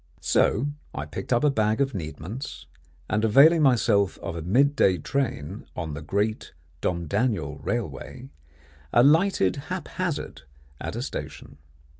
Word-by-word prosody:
So 130 +8 +2 0.3
I - - -3
picked - - -7
up 120 +3 +3
a 150 - +4
bag 110 -3 +1
of 135 -1 +1
needments, 90 - -6 0.4
and 110 0 0
availing 145 +9 +6
myself 110 -7 +3
of - - -6
a 85 - -4
mid 135 - +3
day 95 -9 +4
train 105 - -3
on 80 -3 -4
the 75 - -6
Great 100 +7 -2 0.3
Domdaniel 85 - -1
Railway, 75 - -4 0.6
alighted 145 - +4
haphazard 185 - -4 0.4
at - - -5
a - - -3
station. 70 - -7
110 Hz, 130 wpm, -25 LUFS, 85-140 Hz, 0.6 s, availing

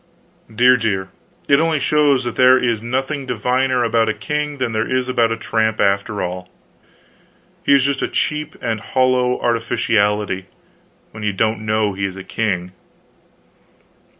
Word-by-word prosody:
Dear, 125 +3 +5
dear, 95 -5 -2 0.4
it 140 0 +4
only 160 -1 +1
shows 140 -1 +2
that 120 -1 -4
there 130 0 +6
is 120 -4 0
nothing 135 +4 -3
diviner 125 +2 0
about 115 -1 +1
a 110 - -1
king 150 -1 -3
than 130 -3 -2
there 110 0 -1
is 130 0 0
about 120 -3 +1
a 115 - -1
tramp, 110 -1 -1
after 100 +1 0
all. 90 0 -5 1.1
He 140 - +5
is 135 - +3
just 140 -1 -1
a - - 0
cheap 150 0 -2
and 115 -1 -1
hollow 125 +1 +1
artificiality 105 -5 0 0.6
when 110 - -10
you 105 -1 -1
don't 110 +2 -1
know 110 -1 +1
he 95 +1 -3
is 95 0 -5
a 95 - -7
king. 90 -5 -2
115 Hz, 155 wpm, -19 LUFS, 105-130 Hz, 1.1 s, there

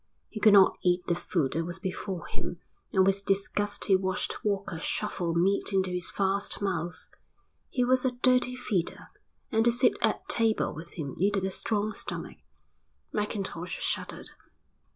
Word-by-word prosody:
He 215 - -6
could 215 -1 +6
not 195 -2 +6
eat 180 0 +2
the - - +1
food 170 -4 -1
that 165 - 0
was 175 +2 -5
before 190 -1 -4
him 175 - -6 0.3
and 190 -1 +4
with 195 +1 +1
disgust 205 +1 0
he 195 - +5
watched 185 0 -1
Walker 200 -5 -1
shovel 175 -2 -1
meat 195 +4 +2
into 190 -1 +2
his 180 -1 -2
vast 200 +1 0
mouth. 175 -3 -3 0.6
He 250 -2 +1
was 255 0 +3
a 260 - +3
dirty 250 0 +4
feeder, 200 -8 -2 0.4
and 220 0 +3
to 235 - +5
sit 245 +1 +4
at - - 0
table 225 -2 +2
with 165 +2 -9
him 140 -5 -4
needed 195 +1 +2
a 190 - -1
strong 215 +1 -1
stomach. - - -5 0.8
Mackintosh 195 -5 -3
shuddered. - - -1
195 Hz, 160 wpm, -28 LUFS, 180-210 Hz, 0.8 s, could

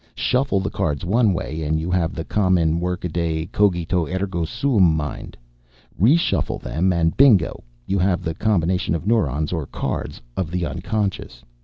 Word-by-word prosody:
Shuffle 125 -5 +1
the 95 - -3
cards 75 0 -2
one 110 +3 +3
way 80 -3 -3
and 80 +1 0
you 85 +3 -3
have 90 -2 0
the 80 - -4
common 90 -5 +2
workaday 85 -2 -2
cogito, 90 -4 +1
ergo 95 -2 -2
sum 95 - +2
mind. 75 -2 -5 0.6
Reshuffle 145 - +2
them, 90 +4 0
and, 80 -2 +1
bingo! 130 -8 +4 0.2
you 100 +6 0
have 90 0 +1
the 80 -2 -2
combination 90 -3 0
of 80 - -5
neurons, 80 - +1
or 80 -5 -3
cards, - - -4 0.2
of 95 -5 -2
the 90 0 -2
unconscious. 95 - -3
90 Hz, 155 wpm, -22 LUFS, 80-100 Hz, 0.6 s, bingo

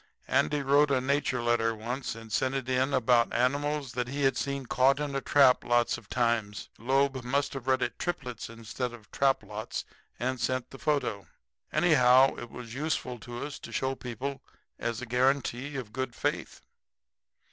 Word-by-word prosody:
Andy 145 -1 +2
wrote 140 +2 +4
a 135 -2 +3
nature 130 -2 0
letter 115 -1 +2
once 120 +4 -4
and 115 -1 -10
sent 130 0 +1
it 135 -2 -2
in 130 +1 +1
about 125 -3 +3
animals 140 +2 0
that 125 0 -2
he 140 +3 -3
had 135 0 +3
seen 140 -1 -2
caught 130 +3 +3
in 145 -1 -2
a 135 - -1
trap 135 -3 +5
lots 120 0 +2
of - - -12
times. 115 -4 0
Loeb 135 +2 +1
must 140 +4 0
have 135 -2 -7
read 130 -1 +3
it - - -3
'triplets,' 125 -12 -4
instead 115 +2 -5
of 110 -3 -14
'trap 135 -1 +2
lots,' 110 +1 -5 0.3
and 130 +1 -1
sent 130 0 -1
the 135 - -10
photo. 140 -10 -1 0.4
Anyhow, 135 -6 +5
it 120 - -7
was 120 -2 -9
useful 130 -3 -2
to 120 +2 -6
us 145 - -7
to - - -10
show 130 0 0
people 130 +2 -5 0.4
as 120 +1 -3
a - - -3
guarantee 130 +2 0
of 120 -6 -6
good 130 -2 -3
faith. - - -3
130 Hz, 180 wpm, -29 LUFS, 120-140 Hz, 0.4 s, trap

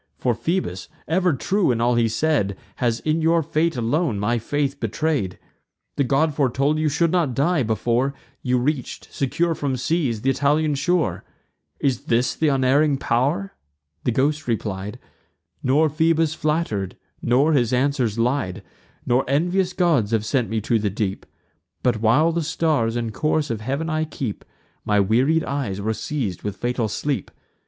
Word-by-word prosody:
For 125 - +1
Phoebus, 115 - -2 0.2
ever 180 +2 +2
true 190 +7 +1
in 120 -2 +1
all 120 +1 +2
he 120 -1 +3
said, 115 -6 0 0.2
Has 120 -2 0
in 155 +1 0
your 165 +1 +3
fate 165 +1 0
alone 120 - 0
my 115 +4 +1
faith 140 +3 -2
betray'd. 115 - -1 0.6
The 140 - +2
god 145 +4 +2
foretold 140 +2 +1
you 155 -1 +2
should 165 +3 +1
not 165 -9 +1
die, 160 +3 +2
before 120 +4 0 0.3
You 125 -1 +1
reach'd, 130 +1 -2
secure 165 +5 0
from 140 -4 -2
seas, 130 -5 0
th' - - -12
Italian 145 +3 +2
shore. 175 +4 0 0.6
Is 135 -4 0
this 120 +2 +1
th' 160 - 0
unerring 140 +1 +3
pow'r?" 140 +12 0 0.5
The - - +1
ghost 145 +5 0
replied; 105 -2 -3 0.6
"Nor 145 +5 +3
Phoebus 160 +1 +2
flatter'd, 150 - -1 0.2
nor 135 +6 +3
his 120 -4 +2
answers 125 -4 +1
lied; 120 -5 -1 0.4
Nor 125 +2 +2
envious 175 +6 +1
gods 165 - +2
have 110 -2 0
sent 125 -1 0
me 110 0 0
to 115 +2 +1
the 105 -1 0
deep: 100 -1 -3 0.6
But, 120 -4 +1
while 145 +9 +4
the 170 +1 -1
stars 155 -7 0
and 115 -2 -2
course 155 0 0
of 110 -2 -3
heav'n 140 +8 -2
I 155 -1 0
keep, 130 -8 -5 0.4
My 105 -1 +2
wearied 130 +11 +3
eyes 135 -9 -3
were 110 +2 -1
seiz'd 110 - -3
with 105 -2 -4
fatal 120 +1 -1
sleep. 140 +5 -2
135 Hz, 160 wpm, -22 LUFS, 115-155 Hz, 0.6 s, while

